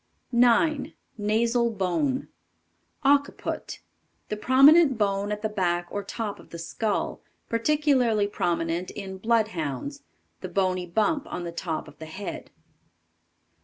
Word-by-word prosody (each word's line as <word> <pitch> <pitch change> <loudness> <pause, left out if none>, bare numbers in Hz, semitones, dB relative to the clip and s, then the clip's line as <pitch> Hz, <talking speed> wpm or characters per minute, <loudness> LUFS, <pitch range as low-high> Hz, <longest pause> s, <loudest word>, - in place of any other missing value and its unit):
9. 265 +5 +3 0.3
NASAL 230 +3 +2
BONE. 230 +9 0 0.8
Occiput. 285 0 0 0.5
The 210 - -1
prominent 270 +5 +6
bone 200 -1 0
at 210 +1 -4
the - - +2
back 175 -4 -1
or 205 - -3
top 210 +1 -4
of - - -15
the 170 - -8
skull; 200 +5 -2 0.3
particularly 245 -3 +2
prominent 170 -3 -1
in 190 -2 -7
Bloodhounds; 220 - -1 0.4
the - - -6
bony 185 -2 0
bump 220 - 0
on 175 - -4
the 170 - -4
top 165 -2 -4
of 150 - -15
the 160 - -8
head. 190 +5 -7
210 Hz, 125 wpm, -26 LUFS, 180-250 Hz, 0.8 s, prominent